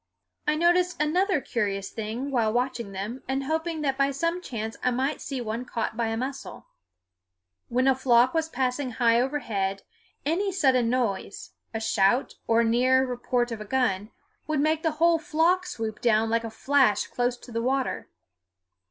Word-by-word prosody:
I 300 - +3
noticed 350 +2 +2
another 355 +4 +2
curious 200 -6 -2
thing 225 +5 -4
while 230 -4 +2
watching 240 -3 -1
them 205 +7 -5
and 270 +1 -1
hoping 320 +2 -2
that 275 -2 -1
by 275 0 +4
some 335 +6 -1
chance 225 -7 -5
I - - +3
might 265 +4 -1
see 270 -2 -4
one 230 +1 -3
caught 230 -3 -3
by 230 0 0
a 225 0 -2
mussel. 265 +3 -6 1.0
When 255 +2 +2
a 270 - +6
flock 250 -1 +3
was 320 -1 0
passing 255 -1 -1
high 230 0 +3
overhead, 205 -8 -2 0.4
any 375 +7 0
sudden 265 -10 +2
noise 230 -6 -2 0.2
a 225 - -3
shout, 220 +3 +2
or 230 0 +4
the 225 - +1
near 260 +2 +4
report 245 -1 -1
of 225 -2 -5
a - - -6
gun 210 -5 0 0.4
would 310 -2 0
make 310 +2 +2
the 320 -2 0
whole 335 +1 +4
flock 350 +3 +1
swoop 225 -10 -5
down 225 -1 +2
like 230 0 +1
a 225 - -4
flash 265 -1 +2
close 245 0 -1
to 245 - -13
the 230 0 -2
water. 260 +2 -1
255 Hz, 175 wpm, -26 LUFS, 230-295 Hz, 1.0 s, a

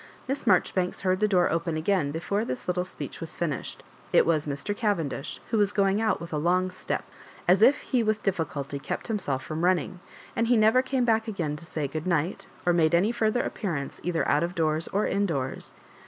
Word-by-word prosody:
Miss 270 +2 -2
Maijoribanks 185 -1 +2
heard 185 -1 +1
the 215 - +3
door 185 -4 +3
open 165 0 -1
again 160 -2 +1
before 175 +7 -1
this 245 - -5
little 180 0 0
speech 185 - -8
was 165 - -7
finished. 155 -6 -3 0.3
It - - +5
was 155 -2 +1
Mr. 145 +9 -3
Cavendish, 165 - -2
who 225 - +2
was 205 -1 +3
going 200 0 +2
out 220 - +1
with 170 -1 -8
a 150 - 0
long 180 +3 +2
step, 185 - -3 0.4
as 185 +3 +5
if 260 +6 +6
he 255 -3 +1
with 215 -1 0
difficulty 150 -7 -2
kept 140 - -5
himself 145 -12 -1
from 155 +3 -4
running; 180 0 +1 0.4
and 230 0 +1
he 240 0 +4
never 220 +4 +5
came 260 -1 0
back 225 -1 +2
again 170 -9 -2
to 155 - -10
say 155 -2 -2
good 155 +5 -5
night, 170 +1 0 0.2
or 175 - +4
made 165 -1 +4
any 195 +6 +3
further 235 0 +1
appearance 155 -10 -4
either 170 0 0
out 145 - +3
of 175 +2 -2
doors 155 -1 +1
or 205 +2 0
indoors. 165 -10 -1
180 Hz, 205 wpm, -27 LUFS, 155-210 Hz, 0.4 s, if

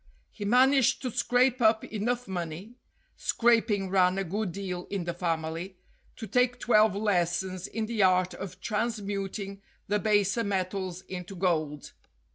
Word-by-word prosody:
He 205 - -7
managed 260 +4 +4
to 255 - -2
scrape 245 +2 +2
up 220 -1 +4
enough 240 +3 -2
money 180 +3 -5 0.4
(scraping 220 -5 +2
ran 185 -1 +3
a 195 - 0
good 195 +2 -2
deal 180 -1 -5
in 195 -3 -2
the 170 0 -3
family) 165 +1 -3 0.4
to 225 - -7
take 245 +3 +2
twelve 215 -4 +4
lessons 185 -2 0
in 225 0 -3
the 225 -1 -1
art 185 -1 +3
of 195 -2 -8
transmuting 200 -3 -3 0.3
the 210 +1 +1
baser 205 +1 +2
metals 185 -2 -2
into 185 +1 -7
gold. 155 -5 -1
200 Hz, 140 wpm, -28 LUFS, 180-220 Hz, 0.4 s, managed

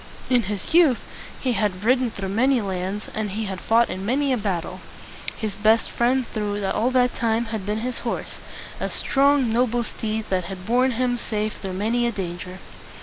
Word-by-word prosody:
In 245 -1 +5
his 205 +5 -3
youth 320 -8 +6 0.4
he 255 - 0
had 205 -4 -1
ridden 250 +1 +3
through 195 -3 -5
many 250 +6 +3
lands, 195 0 -3
and 215 -1 -2
he 215 +3 -3
had 190 -2 -5
fought 230 +1 +4
in 190 - -5
many 265 +5 +1
a - - +1
battle. 185 -3 -3 0.6
His 215 -3 -3
best 220 +1 +3
friend 250 +2 +2
through 205 -2 -3
all 220 +5 +1
that 250 -1 +2
time 230 0 +1
had 205 -3 -4
been 210 +1 -1
his 250 +1 -2
horse, - - -4 0.4
a - - -2
strong, 275 -3 +3
noble 240 0 +2
steed 220 -1 -3
that 185 -2 +1
had 185 0 -7
borne 250 +4 +3
him 245 0 0
safe 215 -1 -2
through 190 -2 -4
many 230 +5 +1
a - - 0
danger. 180 -2 -5
220 Hz, 190 wpm, -23 LUFS, 200-245 Hz, 0.6 s, youth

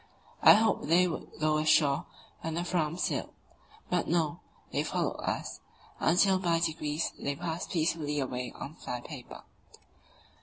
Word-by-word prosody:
I - - +10
hoped 220 -7 +2
they 175 +3 +5
would 165 - -5
go 155 0 +2
ashore 155 0 +3 0.3
when 160 0 -4
the 170 - -1
Fram 170 -2 -1
sailed; - - -2 0.5
but 180 -1 0
no, 165 -1 +1 0.3
they - - 0
followed - - -1
us, - - -3 0.4
until 185 +3 +4
by 170 -3 +2
degrees 160 -2 -1
they 140 0 -2
passed 170 +2 -4
peacefully 155 -3 0
away 125 -2 -3
on 140 - -7
fly 125 -6 -6
paper. 130 -2 -10
160 Hz, 145 wpm, -30 LUFS, 150-175 Hz, 0.5 s, I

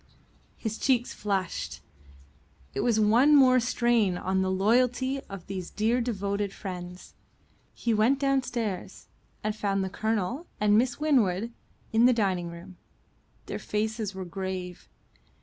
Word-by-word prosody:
His 220 -1 -4
cheeks 250 -3 +1
flushed; 195 -4 -3 0.9
it - - -3
was 225 -1 +2
one 235 +8 +5
more 255 -2 +6
strain 235 -5 +2
on 190 +1 0
the 190 - 0
loyalty 245 +7 +2
of 195 -3 -8
these 185 -3 -5
dear 230 +4 +1
devoted 200 -3 -2
friends. 180 -2 -8 0.6
He 235 - 0
went 220 +6 +3
downstairs, 250 -8 -2 0.3
and 215 0 -1
found 195 -2 0
the 190 - -4
Colonel 220 - -2
and 210 0 +4
Miss 245 +4 +2
Winwood 235 -8 +2 0.4
in 230 +2 +6
the 250 - +5
dining 190 -6 0
room. 175 +2 -11 0.7
Their - - -5
faces 215 -1 -2
were 190 -1 -5
grave. 185 - -5
210 Hz, 130 wpm, -28 LUFS, 190-240 Hz, 0.9 s, more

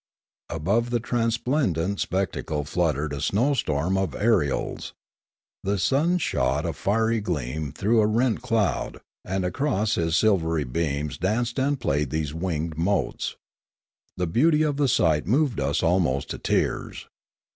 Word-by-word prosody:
Above 100 +10 0
the 120 0 +1
transplendent 115 - 0
spec 95 0 0
tacle 75 -2 -3
fluttered 75 -2 0
a 70 - -4
snow 115 - +2
storm 90 - 0
of 95 - -2
ariels; 105 -11 0 0.7
the 100 +1 0
sun 145 - +2
shot 75 - 0
a 85 - -1
fiery 110 +2 +1
gleam 75 - -3
through 110 +9 +2
a 105 - +3
rent 115 +1 +1
cloud, 115 -6 0 0.2
and 95 0 -2
across 110 -1 0
his 80 -2 +1
silvery 85 -7 +2
beams 70 +2 -2
danced 115 +7 0
and 140 +1 +1
played 75 - 0
these 75 -1 -2
winged 80 -2 -3
motes. 100 +5 -1 0.8
The 90 - 0
beauty 150 - +3
of 145 -2 0
the 145 -1 +2
sight 80 -9 +2
moved 130 - +2
us 70 +1 0
almost 80 -6 +1
to - - -5
tears. - - -1
95 Hz, 145 wpm, -25 LUFS, 80-115 Hz, 0.8 s, a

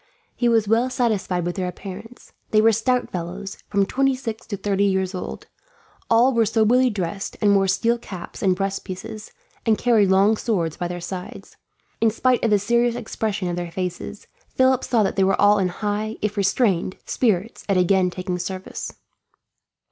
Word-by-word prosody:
He 240 - +1
was 225 -3 +3
well 230 +4 +2
satisfied 215 -8 0
with 175 +2 -3
their 185 -1 -1
appearance. 205 +6 -9 0.2
They 215 - +4
were 225 +1 +5
stout 250 +3 0
fellows, 185 +3 -5
from 200 -1 +2
twenty 270 +5 +1
six 225 -4 -6
to 200 - -4
thirty 200 0 +1
years 190 -1 0
old. 180 - -6 0.6
All 240 +3 +5
were 230 -2 +3
soberly 240 +4 +3
dressed, 195 -2 -4
and 205 -1 +4
wore 195 -1 +3
steel 235 +5 +1
caps 185 -6 -9
and 185 -2 +3
breast 195 +1 -2
pieces, 215 +3 -8 0.3
and 220 -2 +2
carried 220 -5 +3
long 200 +3 +4
swords 175 -10 -1
by 175 - -3
their 175 0 -5
sides. 180 +1 -7 0.5
In 225 - +5
spite 250 +3 +1
of 230 - +3
the 210 - +5
serious 235 +4 +1
expression 215 -4 -3
of 175 - -2
their 175 -1 -4
faces, 180 0 -5 0.2
Philip 260 -1 +2
saw 230 -3 +2
that 195 - -1
all 205 +2 +4
were - - +1
in 185 - +2
high, 210 +3 -3
if 210 -1 -1
restrained, 195 -2 +1
spirits 220 -3 0
at 195 - +3
again 185 0 +3
taking 180 0 -4
service. 185 +1 -5
205 Hz, 180 wpm, -22 LUFS, 185-225 Hz, 0.6 s, were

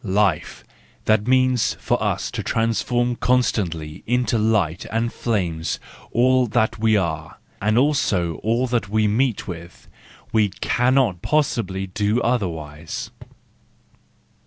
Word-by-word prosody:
Life—that 105 +2 -1
means 130 -1 +3
for - - -1
us - - -1
to - - -3
transform 120 +2 0
constantly 90 -12 0
into 120 -1 +1
light 100 -6 +1
and 115 +2 -1
flame 90 -9 -1 0.5
all 130 +1 +3
that 110 0 0
we 110 -1 +3
are, 80 -4 -3 0.2
and 105 +2 +2
also 105 - +1
all 115 +3 0
that 120 -5 -1
we 110 0 +2
meet 115 +2 0
with; 85 -1 -9 0.5
we 110 -2 +3
cannot 125 -2 +1
possibly 115 -11 0
do 105 +4 0
otherwise. 80 -10 -3
110 Hz, 110 wpm, -22 LUFS, 90-120 Hz, 0.5 s, means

